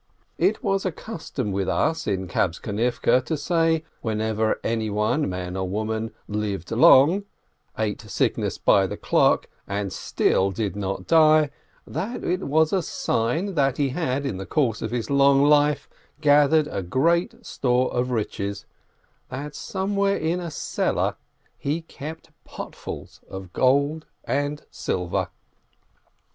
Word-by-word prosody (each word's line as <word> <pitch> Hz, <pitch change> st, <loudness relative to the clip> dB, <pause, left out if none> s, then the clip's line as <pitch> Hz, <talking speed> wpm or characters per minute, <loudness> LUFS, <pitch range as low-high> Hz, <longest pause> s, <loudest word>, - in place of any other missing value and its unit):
It -, -, +2 dB
was 195 Hz, -2 st, +1 dB
a 185 Hz, -, 0 dB
custom 160 Hz, -, -5 dB
with 95 Hz, 0 st, -1 dB
us 160 Hz, -, 0 dB
in 95 Hz, -2 st, -1 dB
Kabtzonivke 105 Hz, +8 st, +1 dB
to 160 Hz, +4 st, -2 dB
say, 165 Hz, +1 st, +1 dB, 0.2 s
when 110 Hz, -2 st, -2 dB
ever 110 Hz, 0 st, 0 dB
anyone, 110 Hz, +4 st, 0 dB
man 90 Hz, 0 st, -4 dB
or 95 Hz, -1 st, -2 dB
woman, 110 Hz, +2 st, -2 dB, 0.2 s
lived 105 Hz, -4 st, -3 dB
long, 140 Hz, -, +6 dB, 0.5 s
ate 110 Hz, -1 st, -1 dB
sicknesses 110 Hz, -3 st, -1 dB
by -, -, +4 dB
the -, -, -6 dB
clock, -, -, +2 dB, 0.2 s
and 100 Hz, -1 st, -3 dB
still 95 Hz, -, +1 dB
did 100 Hz, +1 st, -3 dB
not 95 Hz, -2 st, -3 dB
die, 155 Hz, -2 st, +5 dB, 0.3 s
that 205 Hz, -, -4 dB
it 185 Hz, +2 st, -1 dB
was 155 Hz, +3 st, +3 dB
a 190 Hz, -, +3 dB
sign 160 Hz, -, -1 dB
that 135 Hz, -4 st, +1 dB
he 140 Hz, -2 st, +1 dB
had 140 Hz, -2 st, -1 dB
in 110 Hz, -9 st, -2 dB
the 95 Hz, -, -6 dB
course 125 Hz, -8 st, 0 dB
of 110 Hz, -, -2 dB
his 120 Hz, +3 st, -3 dB
long 140 Hz, 0 st, +5 dB
life 145 Hz, 0 st, +3 dB, 0.3 s
gathered 145 Hz, -, +3 dB
great 170 Hz, -, +1 dB
store 125 Hz, -1 st, 0 dB
of 125 Hz, +1 st, 0 dB
riches, 100 Hz, -4 st, -3 dB, 0.6 s
that 140 Hz, +4 st, -6 dB
somewhere 200 Hz, +1 st, -1 dB
in 165 Hz, +3 st, -1 dB
a 175 Hz, -2 st, -4 dB
cellar 150 Hz, -, -1 dB, 0.4 s
he 155 Hz, +4 st, -2 dB
kept 160 Hz, 0 st, -9 dB
potsful -, -, -7 dB, 0.2 s
of 95 Hz, -2 st, -8 dB
gold 140 Hz, +4 st, +2 dB, 0.2 s
and 145 Hz, +1 st, -2 dB
silver. 90 Hz, -1 st, -2 dB
135 Hz, 135 wpm, -24 LUFS, 105-155 Hz, 0.6 s, long